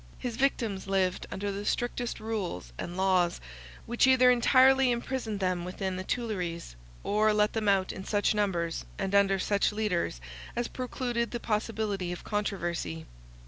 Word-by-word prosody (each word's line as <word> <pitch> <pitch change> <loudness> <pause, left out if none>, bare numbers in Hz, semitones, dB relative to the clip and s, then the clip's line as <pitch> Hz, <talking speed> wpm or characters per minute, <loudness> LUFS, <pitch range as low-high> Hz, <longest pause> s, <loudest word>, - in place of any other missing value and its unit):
His 245 -3 -4
victims 230 -7 0
lived 190 -2 0
under 200 +1 -3
the 200 +1 -4
strictest 240 +2 -2
rules 195 - -4
and 175 +1 -5
laws, 185 -2 +2 0.5
which 240 +2 +3
either 255 -1 +6
entirely 260 +2 +5
imprisoned 240 -3 -2
them 185 -2 0
within 185 +1 -3
the 185 - -4
Tuileries, 180 - -3 0.3
or 215 +1 +3
let 210 0 +2
them 220 -2 +1
out 190 -1 +2
in 190 - -7
such 205 +1 +1
numbers, 175 -6 -1
and 195 0 -2
under 200 -1 +4
such 200 +2 +1
leaders, 205 - -1 0.4
as 240 0 -1
precluded 245 -2 -2
the 240 - -4
possibility 210 -4 -2
of 175 - -6
controversy. 175 - -2
205 Hz, 150 wpm, -29 LUFS, 185-235 Hz, 0.5 s, either